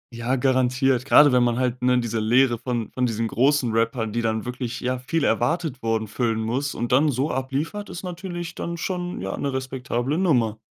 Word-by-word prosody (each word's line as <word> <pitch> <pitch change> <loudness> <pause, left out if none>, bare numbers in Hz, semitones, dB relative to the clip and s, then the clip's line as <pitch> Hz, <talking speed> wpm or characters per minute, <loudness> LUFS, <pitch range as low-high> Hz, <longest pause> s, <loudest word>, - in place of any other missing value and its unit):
Ja, 120 +3 -1
garantiert, 130 0 +2
grade 145 0 +7
wenn 125 - +4
man 120 0 +1
halt, 125 -1 -1
ne, 125 0 +3
diese 115 -1 -2
Leere 120 +2 +3
von 120 -3 -3
von 125 -1 +1
diesen 115 0 -1
großen 130 +1 +2
Rappern, 115 -1 0
die 120 - 0
dann 110 -1 -1
wirklich, 125 -1 -4
ja, 125 0 -2
viel 145 +4 -1
erwartet 140 +4 0
wurden 110 -1 -1
füllen 115 +1 -1
muss 125 +6 -2
und 120 - -3
dann 145 +4 +4
so 135 +3 -1
abliefert, 140 +11 -3
ist 180 -1 -7
natürlich 175 -1 -6
dann 170 0 -5
schon, 180 +1 -3
ja, 95 0 -3
'ne 140 - -2
respektable 130 +2 -2
Nummer. 120 - +2
125 Hz, 195 wpm, -23 LUFS, 115-145 Hz, -, grade